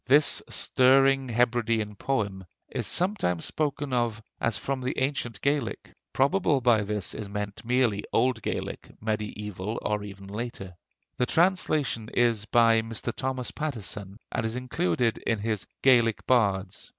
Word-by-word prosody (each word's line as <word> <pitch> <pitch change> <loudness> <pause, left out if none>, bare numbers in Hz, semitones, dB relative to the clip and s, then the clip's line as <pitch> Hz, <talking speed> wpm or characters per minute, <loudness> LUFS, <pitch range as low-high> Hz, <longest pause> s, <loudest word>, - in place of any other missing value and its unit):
This 145 +3 +5
stirring 135 0 +4
Hebridean 115 -2 +1
poem 100 -6 -2 0.3
is - - -2
sometimes 180 - +1
spoken 145 -2 -2
of 120 -3 0 0.2
as 115 -3 0
from 135 -1 -3
the 130 +1 -3
ancient 130 -5 -1
Gaelic. 140 -3 -1 0.2
Probably 140 +2 +2
by 120 -4 +4
this 105 -5 -3
is 105 -2 -6
meant 105 +1 -5
merely 120 -4 +1
old 125 -1 +2
Gaelic, - - -4
mediæval 105 -1 -3
or 105 -1 -1
even 100 -1 -9
later. 100 -3 -6 0.4
The 125 - +1
translation 155 - +1
is 115 -3 +2
by 115 0 +4
Mr. 115 +1 -4
Thomas 130 -1 -3
Pattison, 105 - -5
and - - -1
is 110 +1 -2
included 120 -3 0
in 115 - 0
his 105 -1 -2 0.2
'Gaelic 120 -4 +4
Bards.' 100 -6 +1
115 Hz, 140 wpm, -27 LUFS, 105-130 Hz, 0.4 s, This